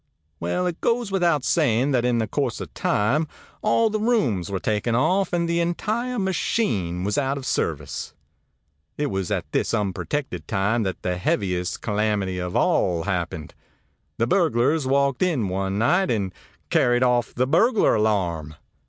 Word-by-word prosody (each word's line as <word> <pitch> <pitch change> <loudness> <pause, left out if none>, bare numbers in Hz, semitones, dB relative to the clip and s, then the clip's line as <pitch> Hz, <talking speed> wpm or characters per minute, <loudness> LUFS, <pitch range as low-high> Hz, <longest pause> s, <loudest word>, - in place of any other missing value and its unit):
Well, 85 - -1
it 175 -2 -3
goes 235 -3 0
without 175 -7 +2
saying 135 -4 +2
that 125 -2 +2
in 125 -1 +2
the 110 - +1
course 130 +3 -2
of - - -8
time 140 +10 +1 0.3
all 225 +2 +3
the 215 - -1
rooms 145 - +1
were 95 -1 -2
taken 105 +6 0
off, 190 +10 +2
and 170 -1 0
the 170 0 +1
entire 220 +9 -1
machine 135 - -1
was 105 +7 0
out 135 0 -1
of 135 - -7
service. 75 - -2 0.8
ãIt 145 -1 -1
was 95 -2 -2
at - - -3
this - - 0
unprotected 100 - -3
time 100 +4 +1
that 95 -3 -3
the 90 -1 -1
heaviest 90 -1 -1
calamity 105 -3 0
of 90 0 -4
all 85 -2 +2
happened. 85 -6 -3 0.6
The 115 - +2
burglars 150 -2 +2
walked 140 -1 +1
in 150 - +1
one 95 +1 -2
night 175 - +2
and 100 -5 -1 0.4
carried 120 +1 +3
off 125 -1 +1
the 125 - +2
burglar 205 - +3
alarm! 90 -8 0
120 Hz, 160 wpm, -23 LUFS, -, 0.8 s, all